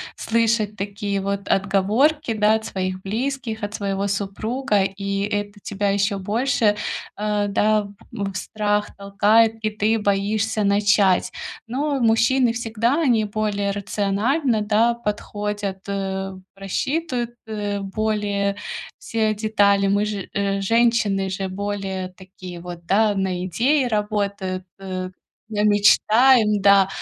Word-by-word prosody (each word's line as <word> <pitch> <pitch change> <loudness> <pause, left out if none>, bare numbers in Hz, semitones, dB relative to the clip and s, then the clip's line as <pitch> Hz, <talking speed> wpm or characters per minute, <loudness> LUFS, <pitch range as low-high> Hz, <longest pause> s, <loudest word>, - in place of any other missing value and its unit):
слышать 225 -2 0
такие 200 0 -3
вот 200 0 -3
отговорки, 215 +10 +2
да, 215 -1 +3
от 220 0 -1
своих 185 -1 -3
близких, 230 +2 -3
от 205 0 -4
своего 200 -1 -2
супруга, 205 +3 -1
и 195 +1 -2
это 205 0 -3
тебя 200 +1 -2
ещё 200 +1 +1
больше, 210 +1 +1 0.4
э, 210 0 0
да, 210 0 +2 0.2
в 200 -4 -4
страх 210 +2 -1
толкает, 210 +3 +3
и - - +2
ты 215 +1 0
боишься 210 +2 0
начать. 200 -2 +3 0.3
Но 280 +4 -1
мужчины 235 +2 +3
всегда, 235 +5 0
они 235 -8 +3
более 205 -1 -1
рациональны, 210 - 0
да, 220 +3 +3
подходят, 210 -3 -4
э, 195 -1 -3 0.2
просчитывают, 245 - -2 0.2
э, 205 -2 -3
более 200 0 -1 0.4
все 220 -1 0
детали. 205 -2 +2
Мы 200 +1 +2
же 205 -2 -4 0.3
женщины, 225 -2 +2
же 190 0 -3
более 195 -1 -4
такие 185 -1 -11
вот, 175 -1 -9
да, 205 +3 +3
на 190 -2 -1
идеи 255 - +2
работают, 200 -4 -2
э, 185 -1 -4 0.4
мечтаем, 210 +2 +4
да. 200 -1 +6
205 Hz, 120 wpm, -22 LUFS, 195-220 Hz, 0.4 s, да